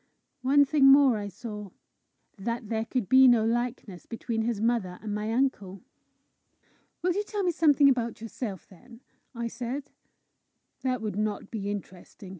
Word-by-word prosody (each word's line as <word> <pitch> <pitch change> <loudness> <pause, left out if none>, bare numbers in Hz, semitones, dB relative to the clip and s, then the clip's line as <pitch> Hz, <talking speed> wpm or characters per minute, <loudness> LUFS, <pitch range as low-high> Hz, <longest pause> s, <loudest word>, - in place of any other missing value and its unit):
One 285 +3 +4
thing 280 0 +3
more 270 -3 +7
I 205 - -5
saw 210 0 -8 0.7
that 230 +2 -4
there 225 0 -1
could 240 -3 -2
be 260 +3 +7
no 235 -3 +5
likeness 235 -5 -3
between 230 -1 -3
his 225 -2 -1
mother 220 -5 0
and 215 -1 -5
my 210 +1 -2
uncle! 215 -7 -1 1.2
"Will 360 0 +2
you 410 +3 -1
tell 415 -1 -3
me 360 - +2
something 295 -3 +4
about 240 -4 +1
yourself, 220 -4 -6
then?" 230 +6 -17 0.3
I 235 0 -3
said. 250 +4 -5 0.9
"That 255 -3 -1
would 210 -2 -3
not 210 -1 -3
be 205 -3 -4
interesting!" 195 -1 -8
230 Hz, 155 wpm, -27 LUFS, 210-260 Hz, 1.2 s, more